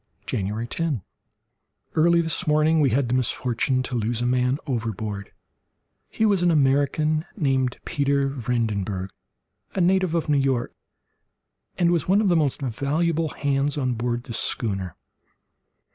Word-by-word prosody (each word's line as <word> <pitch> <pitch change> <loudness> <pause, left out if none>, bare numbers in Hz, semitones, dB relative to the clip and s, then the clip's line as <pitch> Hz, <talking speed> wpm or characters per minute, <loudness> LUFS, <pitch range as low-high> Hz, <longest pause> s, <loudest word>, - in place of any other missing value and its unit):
January 105 +3 -2
10.—Early 165 - -2
this 160 -2 -1
morning 155 +1 +3
we 140 - +4
had 130 +2 +1
the 120 - -1
misfortune 130 0 0
to 130 - -6
lose 115 0 -1
a 120 - -1
man 125 +1 +2
overboard. 110 -6 -3 0.8
He 220 - 0
was 200 -4 +3
an 175 - +3
American 150 +1 +2
named 130 - +1
Peter 140 -1 +1
Vredenburgh, 110 -7 -2 0.6
a - - 0
native 185 -1 +2
of 165 - 0
New 145 -2 +3
York, 135 -3 0 1.0
and 175 -1 +3
was 170 -3 0
one 195 +3 +4
of 210 -3 +2
the 175 - +4
most 145 -3 0
valuable 155 +6 0
hands 140 0 -1
on 130 -3 0
board 120 +1 -2
the 120 - -7
schooner. 95 -6 -2
135 Hz, 140 wpm, -24 LUFS, 120-155 Hz, 1.0 s, we